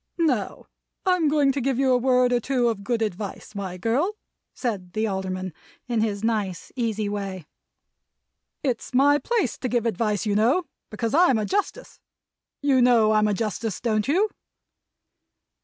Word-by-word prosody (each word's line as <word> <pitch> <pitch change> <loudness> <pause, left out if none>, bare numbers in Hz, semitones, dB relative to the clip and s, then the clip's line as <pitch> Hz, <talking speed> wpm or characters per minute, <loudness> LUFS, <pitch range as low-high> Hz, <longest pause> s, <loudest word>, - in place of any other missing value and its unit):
"Now, 270 - 0 0.4
I'm 365 -4 +3
going 290 -2 +3
to 275 0 -2
give 265 0 0
you 265 -1 +3
a - - +5
word 250 0 +3
or 245 - +3
two 245 -1 +1
of 210 -3 -4
good 230 +1 0
advice, 205 0 -5
my 190 -3 -5
girl," 265 - 0 0.4
said 195 -8 -4
the 220 0 0
Alderman, 190 -3 -3 0.3
in 235 -3 0
his 210 -2 -1
nice 210 -6 -2
easy 220 -4 -1
way. 195 -4 -4 1.2
"It's 255 -2 -2
my 285 +2 +5
place 445 - -1
to 255 - -2
give 240 -1 0
advice, 215 -1 0
you 210 - +1
know, 235 - +3 0.3
because 225 +1 -3
I'm 325 -6 +5
a 215 - -1
Justice. 410 - -3 0.6
You 270 -3 +4
know 235 -3 +5
I'm 215 0 +3
a 210 - +1
Justice, 215 -1 -3
don't 215 -3 0
you?" 385 +9 +2
230 Hz, 160 wpm, -24 LUFS, 210-270 Hz, 1.2 s, a